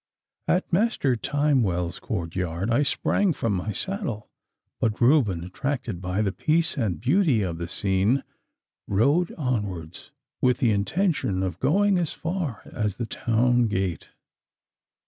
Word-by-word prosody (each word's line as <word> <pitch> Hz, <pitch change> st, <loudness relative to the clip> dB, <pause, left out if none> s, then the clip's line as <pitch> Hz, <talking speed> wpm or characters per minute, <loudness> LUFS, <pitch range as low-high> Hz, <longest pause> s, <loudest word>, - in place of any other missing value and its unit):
At 180 Hz, 0 st, 0 dB
Master 185 Hz, -, +2 dB
Timewell's 115 Hz, -, 0 dB
courtyard 90 Hz, +1 st, -3 dB
I 120 Hz, -, +3 dB
sprang 180 Hz, +5 st, +2 dB
from 115 Hz, -6 st, -1 dB
my 95 Hz, +3 st, -2 dB
saddle, 150 Hz, -, -3 dB, 0.5 s
but 110 Hz, -2 st, 0 dB
Reuben, 120 Hz, -, +3 dB
attracted 120 Hz, +1 st, -3 dB
by 95 Hz, +3 st, -1 dB
the 100 Hz, -, 0 dB
peace 160 Hz, -, +1 dB
and 105 Hz, -, -1 dB
beauty 140 Hz, -, +2 dB
of 85 Hz, -3 st, -3 dB
the 85 Hz, -, -3 dB
scene, 100 Hz, +8 st, +1 dB, 0.6 s
rode 140 Hz, -, +2 dB
onwards 100 Hz, -, -3 dB, 0.3 s
with 125 Hz, -1 st, +3 dB
the 120 Hz, -, +2 dB
intention 105 Hz, -, 0 dB
of 90 Hz, -2 st, -3 dB
going 195 Hz, +7 st, +3 dB
as 170 Hz, -3 st, -1 dB
far 165 Hz, -, -4 dB
as 105 Hz, -3 st, -2 dB
the 120 Hz, -, -2 dB
town 120 Hz, +2 st, +2 dB
gate. 95 Hz, -4 st, -2 dB
115 Hz, 130 wpm, -25 LUFS, 95-145 Hz, 0.6 s, I